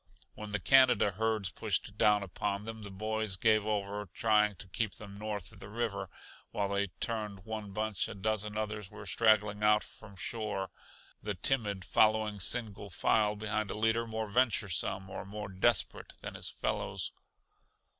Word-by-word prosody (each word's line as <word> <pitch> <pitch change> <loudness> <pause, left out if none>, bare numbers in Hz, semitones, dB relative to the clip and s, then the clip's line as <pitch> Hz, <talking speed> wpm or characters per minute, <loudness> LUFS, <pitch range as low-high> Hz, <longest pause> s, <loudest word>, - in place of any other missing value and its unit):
When 105 -1 -8
the 105 - 0
Canada 130 -1 +6
herds 110 -2 0
pushed - - -1
down 105 -1 +4
upon 100 +2 -3
them 110 0 -6
the 100 - -7
boys 110 0 -1
gave 110 +2 +3
over 105 -1 -2
trying 105 -2 +3
to 100 - -10
keep 110 +3 -2
them 100 -1 -10
north 105 -3 -4
of - - -15
the 100 - -10
river; 105 -4 -2 0.4
while 100 -1 -1
they 100 0 +1
turned 105 -4 -3
one 110 -2 -5
bunch 105 0 -1
a - - -7
dozen 105 +1 -1
others 105 -2 -3
were 105 - -10
straggling 105 -2 +3
out 105 0 +5
from 100 -2 -12
shore, 100 +1 -3 0.5
the 105 -1 -2
timid 100 -3 +1
following 110 -1 +3
single 105 0 -1
file 105 +4 +2
behind 105 0 -1
a - - -4
leader 110 +2 +2
more 110 0 -2
venturesome 100 -4 +1
or 95 - -6
more 105 +1 -6
desperate 100 +4 +1
than - - -6
his - - -6
fellows. - - -2
105 Hz, 165 wpm, -32 LUFS, 100-110 Hz, 0.5 s, Canada